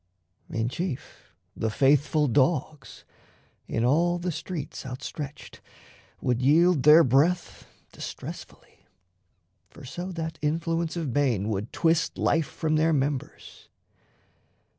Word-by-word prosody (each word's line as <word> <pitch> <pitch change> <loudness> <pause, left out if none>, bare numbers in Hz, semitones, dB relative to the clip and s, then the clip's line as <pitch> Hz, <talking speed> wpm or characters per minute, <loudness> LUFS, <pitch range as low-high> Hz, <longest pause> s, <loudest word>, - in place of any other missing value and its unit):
In 115 0 -1
chief, 165 +1 -6 0.2
the 110 - -1
faithful 145 +5 +3
dogs, 140 +2 0 0.6
in 115 - -1
all 170 +7 +2
the 175 +1 -3
streets 165 -1 -6
Outstretched, 140 +3 -7 0.6
would 125 0 0
yield 160 +3 +4
their 150 +4 +8
breath 155 +7 +1 0.2
distressfully - - -10 0.8
For - - -13
so 175 +8 -6
that 160 -1 -5
Influence 165 +2 -1
of 155 -7 -3
bane 120 -8 +1
would 105 +1 -3
twist 165 -1 +1
Life 160 -2 +1
from 155 -1 -1
their 160 +1 +3
members. 140 -1 -3
150 Hz, 110 wpm, -26 LUFS, 130-165 Hz, 0.8 s, their